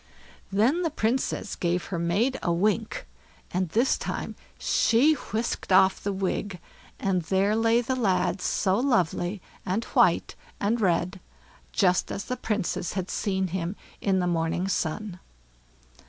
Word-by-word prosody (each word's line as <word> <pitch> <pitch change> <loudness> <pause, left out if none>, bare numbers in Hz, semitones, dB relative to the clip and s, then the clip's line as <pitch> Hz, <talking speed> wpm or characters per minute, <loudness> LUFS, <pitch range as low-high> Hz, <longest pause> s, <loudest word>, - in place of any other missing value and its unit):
Then 235 - +3
the 335 - +1
Princess 245 -5 -1
gave 175 0 -1
her 175 - -3
maid 205 +11 +1
a 170 - 0
wink, 210 +5 0 0.5
and 185 -1 -1
this 235 +10 +2
time - - -4 0.2
she 255 +7 +3
whisked 225 -7 -3
off 190 0 +5
the 200 - -1
wig; 190 0 -2 0.4
and 190 -2 +1
there 195 +5 +1
lay 225 +1 +3
the 255 +2 -1
lad 195 -5 +1
so 190 +2 +1
lovely, 195 - 0 0.2
and 195 +5 -1
white - - +3 0.3
and 225 +3 0
red, 185 0 +1 0.5
just 180 -3 +2
as 200 - -4
the 250 - -2
Princess 200 -6 -2
had 185 -1 -3
seen 190 -3 -1
him 180 +2 -3 0.3
in 195 -2 +2
the 180 - +1
morning 170 +1 0
sun. 180 +1 -2
195 Hz, 140 wpm, -26 LUFS, 180-225 Hz, 0.5 s, off